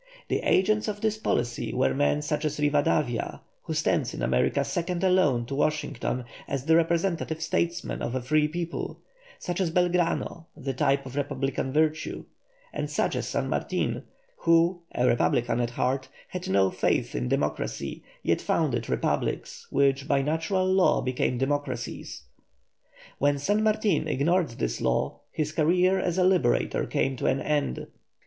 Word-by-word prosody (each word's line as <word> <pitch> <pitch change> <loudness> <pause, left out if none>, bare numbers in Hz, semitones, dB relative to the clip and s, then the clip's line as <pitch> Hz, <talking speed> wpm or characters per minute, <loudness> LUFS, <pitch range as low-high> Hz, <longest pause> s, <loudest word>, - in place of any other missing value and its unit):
The - - +1
agents 215 +4 +2
of 205 -1 -3
this 220 0 0
policy 120 - -1
were 130 - +2
men 145 +2 +1
such 150 +1 -1
as 150 -1 -1
Rivadavia, 145 -4 +1 0.2
who - - -4
stands - - +1
in - - -4
America 65 -1 +2
second 175 +1 -2
alone 180 -11 +3
to 135 - -6
Washington 135 -4 -1 0.2
as 135 -1 -3
the 160 0 +5
representative 170 -1 +1
statesman 170 +1 -1
of 120 - -2
a 130 - -1
free 150 +4 +3
people; 170 +2 -4 0.4
such 175 +1 -3
as 180 - +1
Belgrano, 175 -1 0
the 135 -3 -3
type 140 +1 +1
of 130 0 -8
republican 135 -2 -2
virtue; 155 +2 0 0.5
and - - -3
such - - 0
as - - -2
San - - -1
Martin, - - -1 0.4
who, 170 +2 +3
a 125 - +2
republican 120 0 +2
at 120 -1 0
heart, 130 +2 -1 0.2
had 180 -1 -5
no 95 0 +3
faith - - 0
in 60 0 -2
democracy, - - -2 0.2
yet - - +1
founded 120 -8 0
republics - - -2
which 140 0 +2
by 135 -2 +2
natural 165 +6 0
law 185 0 +3
became 125 -1 0
democracies. 135 -2 -3 1.0
When 145 +1 +3
San 205 +10 +1
Martin 215 -7 +2
ignored 160 +4 +2
this 60 - -3
law, - - 0
his 155 -1 -2
career 180 +5 +3
as 180 -1 -1
a 185 - +4
liberator 180 -10 +2
came 135 0 0
to - - -1
an 130 - +2
end. 145 - -1
150 Hz, 155 wpm, -27 LUFS, 130-175 Hz, 1.0 s, the